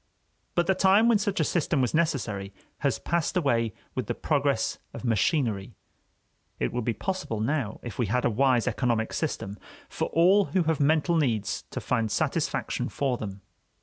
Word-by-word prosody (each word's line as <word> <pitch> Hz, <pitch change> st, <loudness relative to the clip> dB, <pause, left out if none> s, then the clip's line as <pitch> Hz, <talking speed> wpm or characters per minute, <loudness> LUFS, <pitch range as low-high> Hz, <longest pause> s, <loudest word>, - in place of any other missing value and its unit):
But 175 Hz, -, +3 dB
the 190 Hz, -, +3 dB
time 195 Hz, +4 st, +4 dB
when 230 Hz, -3 st, +4 dB
such 200 Hz, -2 st, -1 dB
a -, -, +4 dB
system 155 Hz, -1 st, 0 dB
was 125 Hz, -2 st, +1 dB
necessary 115 Hz, -12 st, -1 dB, 0.2 s
has -, -, +1 dB
passed 170 Hz, +1 st, -1 dB
away 115 Hz, -9 st, +1 dB, 0.2 s
with -, -, -3 dB
the -, -, -2 dB
progress -, -, 0 dB, 0.2 s
of -, -, -7 dB
machinery. 115 Hz, -, 0 dB, 0.8 s
It 60 Hz, -, -1 dB
would 125 Hz, -2 st, -2 dB
be 115 Hz, -, 0 dB
possible 185 Hz, -, -3 dB
now, 115 Hz, -1 st, -1 dB
if 120 Hz, -1 st, -7 dB
we 120 Hz, -, +1 dB
had 125 Hz, +5 st, 0 dB
a -, -, +4 dB
wise 125 Hz, +1 st, +2 dB
economic 115 Hz, -3 st, 0 dB
system, 100 Hz, +1 st, -3 dB, 0.3 s
for -, -, -2 dB
all 190 Hz, +5 st, +4 dB
who 185 Hz, -1 st, +1 dB
have 160 Hz, -2 st, 0 dB
mental 155 Hz, +4 st, +3 dB
needs 110 Hz, -, 0 dB
to -, -, -4 dB
find 115 Hz, -3 st, 0 dB
satisfaction -, -, -1 dB
for 135 Hz, -3 st, -1 dB
them. 100 Hz, -2 st, -6 dB
130 Hz, 175 wpm, -27 LUFS, 110-170 Hz, 0.8 s, time